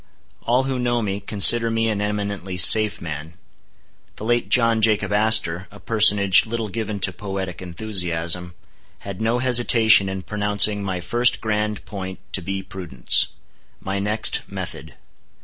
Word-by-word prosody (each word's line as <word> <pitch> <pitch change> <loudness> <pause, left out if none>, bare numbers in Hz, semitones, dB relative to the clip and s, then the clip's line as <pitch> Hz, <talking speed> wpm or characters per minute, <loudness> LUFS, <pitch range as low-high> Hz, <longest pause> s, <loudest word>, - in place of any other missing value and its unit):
All 125 +3 0
who 130 -1 -4
know 120 -1 -1
me, 100 -1 -4
consider 110 +3 +5
me 115 0 -1
an 105 -2 -2
eminently 100 -3 -4
safe 105 +4 +6
man. 80 0 -8 0.8
The 105 - -9
late 120 +1 -1
John 115 -2 +2
Jacob 110 -2 +1
Astor, 105 -4 +1
a 105 - -16
personage 105 -3 +3
little 115 -1 -5
given 105 -1 -5
to 95 - +2
poetic 95 -1 -7
enthusiasm, 90 -2 -4 0.5
had 100 0 -9
no 115 +2 0
hesitation 120 -5 +3
in 95 -1 -6
pronouncing 105 0 +1
my 95 -2 -4
first 120 +8 0
grand 105 -1 -3
point 95 -2 -8 0.2
to 95 - 0
be 95 +2 -5
prudence; 85 -12 0 0.5
my 100 +1 -5
next, 105 +2 -1
method. - - -8
105 Hz, 145 wpm, -20 LUFS, 95-110 Hz, 0.8 s, safe